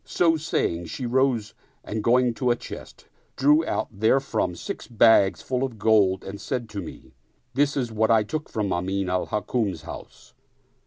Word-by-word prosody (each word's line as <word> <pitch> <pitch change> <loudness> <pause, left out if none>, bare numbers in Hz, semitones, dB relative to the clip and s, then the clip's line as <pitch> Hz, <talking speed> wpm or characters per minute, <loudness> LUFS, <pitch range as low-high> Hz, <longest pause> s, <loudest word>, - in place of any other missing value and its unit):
So 165 -2 +2
saying, 85 - -1
she 125 +10 -5
rose 120 -3 +1 0.3
and 110 0 -4
going 125 +1 +3
to 125 +2 -1
a 120 - +4
chest, - - -10 0.3
drew 150 +4 +4
out - - -1
therefrom 135 +5 +1
six - - -6
bags 105 -6 +4
full 130 0 -1
of 125 -4 -4
gold 100 -3 +3
and 100 +1 -8
said 120 +2 -3
to 105 -2 -5
me, 85 - -11 0.4
This 145 +2 +1
is 125 -4 -1
what 110 0 +1
I 110 -2 +5
took 150 +9 -5
from 105 -4 -1
Amin 95 +1 -1
al 90 0 0
Hukm's 105 -6 -2
house. - - -11
110 Hz, 170 wpm, -25 LUFS, 100-130 Hz, 0.4 s, I